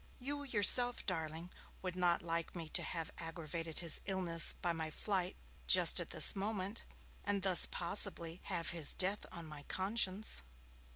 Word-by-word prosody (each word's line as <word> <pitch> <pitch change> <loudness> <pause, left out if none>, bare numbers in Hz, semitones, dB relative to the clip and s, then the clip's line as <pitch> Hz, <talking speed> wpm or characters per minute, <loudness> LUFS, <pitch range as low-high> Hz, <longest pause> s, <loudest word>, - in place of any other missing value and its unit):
You 285 +3 -7
yourself, 245 -1 +1
darling, 165 -1 -6 0.3
would 185 -1 -6
not 175 -2 -1
like 165 0 -6
me 165 -2 -8
to - - +1
have 165 -2 -7
aggravated 165 -1 -8
his 170 -3 0
illness 180 -4 -1
by 175 -1 -3
my 160 -1 -7
flight 185 +2 -4 0.3
just - - +5
at - - -6
this - - +7
moment, 200 +1 -6 0.4
and 200 -1 -4
thus 185 -3 +8
possibly 170 -2 +3
have 165 - -4
his 165 -4 -1
death 195 +2 0
on 170 -3 -11
my 150 -2 -12
conscience.' 195 - -1
180 Hz, 155 wpm, -33 LUFS, 165-200 Hz, 0.4 s, thus